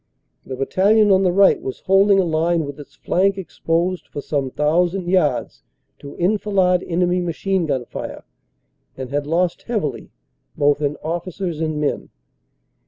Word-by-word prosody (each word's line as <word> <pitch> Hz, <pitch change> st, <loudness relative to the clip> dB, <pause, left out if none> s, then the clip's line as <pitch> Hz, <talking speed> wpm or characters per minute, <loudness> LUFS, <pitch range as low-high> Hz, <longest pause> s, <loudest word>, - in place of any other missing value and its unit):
The 130 Hz, -, -5 dB
battalion 200 Hz, +10 st, +3 dB
on 190 Hz, 0 st, +5 dB
the 185 Hz, -2 st, +2 dB
right 195 Hz, +2 st, +4 dB
was 130 Hz, -, -6 dB
holding 195 Hz, +1 st, +4 dB
a -, -, +3 dB
line 165 Hz, 0 st, +1 dB
with 145 Hz, +1 st, -8 dB
its 140 Hz, -1 st, -12 dB
flank 195 Hz, +7 st, +1 dB
exposed 175 Hz, -1 st, -2 dB
for -, -, -7 dB
some 140 Hz, -2 st, -2 dB
thousand 175 Hz, +6 st, 0 dB
yards 180 Hz, -5 st, 0 dB, 0.4 s
to 140 Hz, -, -10 dB
enfilade 190 Hz, -1 st, +2 dB
enemy 180 Hz, +1 st, +1 dB
machine 175 Hz, +1 st, -1 dB
gun 130 Hz, -4 st, -1 dB
fire, -, -, -7 dB, 0.7 s
and 130 Hz, -1 st, -6 dB
had 145 Hz, 0 st, -2 dB
lost 170 Hz, +2 st, 0 dB
heavily 210 Hz, -, -3 dB, 0.5 s
both 145 Hz, 0 st, +2 dB
in 145 Hz, 0 st, -1 dB
officers 170 Hz, 0 st, -4 dB
and 155 Hz, -2 st, -1 dB
men. 150 Hz, -1 st, -2 dB
175 Hz, 150 wpm, -20 LUFS, 150-190 Hz, 0.7 s, on